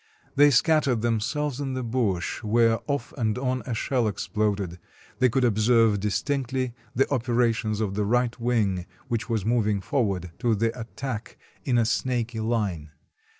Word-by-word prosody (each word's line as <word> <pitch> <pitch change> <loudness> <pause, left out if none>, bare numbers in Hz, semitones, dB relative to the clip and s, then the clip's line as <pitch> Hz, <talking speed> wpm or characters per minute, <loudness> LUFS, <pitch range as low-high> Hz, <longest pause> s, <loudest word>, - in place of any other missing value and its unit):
They 145 +1 +7
scattered 140 -3 +3
themselves 125 +5 -1
in 135 -2 -2
the 130 - -2
bush, 115 -7 -1
where 115 +1 +3
off 140 -4 -2
and 110 -1 0
on 130 0 -1
a 120 - -2
shell 125 0 0
exploded; 100 -3 -2 0.4
they 130 - +5
could 130 +3 +1
observe 115 -1 +3
distinctly 130 +4 -1 0.2
the 135 +3 +3
operations 115 -3 +1
of 100 -3 -1
the 105 +1 0
right 120 +3 +1
wing, 105 -7 0 0.2
which 115 0 -2
was 110 -4 -1
moving 110 -3 +2
forward 95 - -1
to 115 -2 +2
the 115 +3 0
attack 115 0 -6 0.3
in 125 -3 +2
a 115 - +3
snaky 120 -1 -1
line. 105 -9 -1
115 Hz, 150 wpm, -26 LUFS, 105-125 Hz, 0.4 s, They